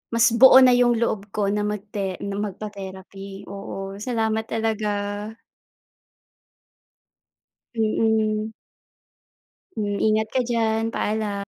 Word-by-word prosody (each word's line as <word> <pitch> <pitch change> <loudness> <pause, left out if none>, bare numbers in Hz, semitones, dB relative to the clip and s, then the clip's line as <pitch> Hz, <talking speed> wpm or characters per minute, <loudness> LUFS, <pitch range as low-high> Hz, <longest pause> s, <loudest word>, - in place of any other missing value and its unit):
mas 230 0 +5
buo 265 0 +9
na 255 - +7
yung 245 -1 +4
loob 215 -3 -1
ko 200 -1 +1
na 210 - 0
magte 205 -2 -4
na 200 0 -3
magpa-therapy, 195 -1 -7
oo. 195 0 -7
Salamat 220 -1 -1
talaga. 220 -1 -1 2.9
Mm. 220 -1 +1 1.3
Hmm, 205 -1 -1
ingat 220 0 +2
ka 260 - +2
diyan. 225 -2 0
Paalam. 210 -2 -2
215 Hz, 100 wpm, -23 LUFS, 200-225 Hz, 2.9 s, buo